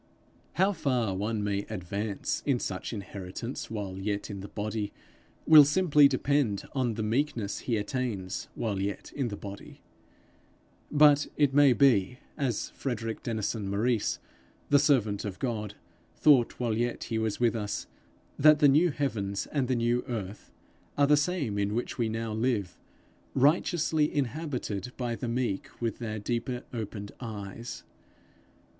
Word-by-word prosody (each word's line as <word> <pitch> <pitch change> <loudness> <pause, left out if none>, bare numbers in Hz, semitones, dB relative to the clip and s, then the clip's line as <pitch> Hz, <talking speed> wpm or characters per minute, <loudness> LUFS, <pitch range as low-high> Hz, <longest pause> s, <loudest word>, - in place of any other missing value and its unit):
How 190 +3 +3
far 130 - 0
one 105 +3 -2
may 100 -1 0
advance 100 +1 -3
in 135 -4 +1
such 95 -4 -4
inheritance 100 +3 -6
while 100 -4 -5
yet 100 +2 -3
in 100 - -6
the 100 - -7
body, 105 0 -3 0.5
will 155 -2 +10
simply 150 -1 +5
depend 140 -8 +1
on 125 -5 0
the 110 - -2
meekness 115 -2 -1
he 115 -3 -1
attains 105 -4 -3
while 100 -4 -2
yet 100 0 -4
in 135 -4 -1
the 100 -3 -5
body; 100 -1 -9 1.1
but 145 -1 +6
it 145 -3 +3
may 145 -2 +6
be, 125 -4 +3 0.2
as 130 -8 -2
Frederick 115 -4 -4
Denison 110 -2 -2
Maurice, 110 +3 +1 0.5
the 145 - +7
servant 120 -9 +2
of 100 -3 -5
God, 105 -5 -3 0.4
thought 135 -6 +4
while 120 -3 0
yet 120 +2 -1
he 110 - -2
was 110 -2 -1
with 120 -1 +2
us, 105 -2 -3 0.5
that 150 +1 +7
the 150 -1 +6
new 155 +6 +5
heavens 110 -10 -2
and 140 -4 0
the 130 - +1
new 120 +1 +1
earth 105 -5 -5 0.5
are 145 - +5
the 150 +1 +5
same 145 - 0
in 100 +1 0
which 120 +2 -3
we 115 -2 +1
now 115 0 -3
live, 110 -5 -1 0.6
righteously 155 +2 +2
inhabited 130 - -3
by 120 -2 -2
the 120 - -5
meek, 115 -4 -1
with 115 -2 -2
their 110 -2 -4
deeper 120 +3 -3
opened 105 -3 -5
eyes. 110 0 -7
115 Hz, 150 wpm, -29 LUFS, 105-135 Hz, 1.1 s, will